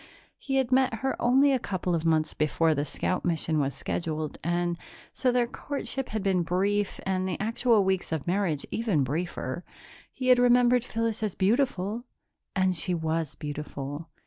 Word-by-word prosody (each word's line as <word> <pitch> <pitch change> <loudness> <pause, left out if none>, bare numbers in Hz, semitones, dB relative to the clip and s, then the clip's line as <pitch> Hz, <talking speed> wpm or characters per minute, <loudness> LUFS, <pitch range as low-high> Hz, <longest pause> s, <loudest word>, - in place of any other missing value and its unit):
He 270 - -3
had 265 -2 +1
met 260 -2 +3
her 265 - +1
only 265 +4 +5
a 265 - +2
couple 185 -4 -2
of 165 -1 0
months 155 -1 +2
before 155 +2 +2
the 145 0 -1
scout 180 +6 -2
mission 160 -2 +1
was 135 -2 0
scheduled, 155 -2 -3
and 175 0 0 0.3
so 255 - +1
their 245 -1 +2
courtship 270 +1 -4
had 215 -2 -3
been 190 -3 +2
brief, 195 +4 0
and 185 -1 0
the 180 - -3
actual 225 0 +2
weeks 190 -3 0
of 160 -4 -2
marriage 175 -5 0
even 210 - +1
briefer. 160 +1 -3 0.5
He 255 -1 -2
had 250 -1 +7
remembered 245 0 +5
Phyllis 230 -3 -2
as 215 -4 -2
beautiful 220 0 +1 0.5
and 185 -1 +2
she 175 +2 0
was 160 -2 -2
beautiful. 145 +1 -6
185 Hz, 170 wpm, -27 LUFS, 160-235 Hz, 0.5 s, had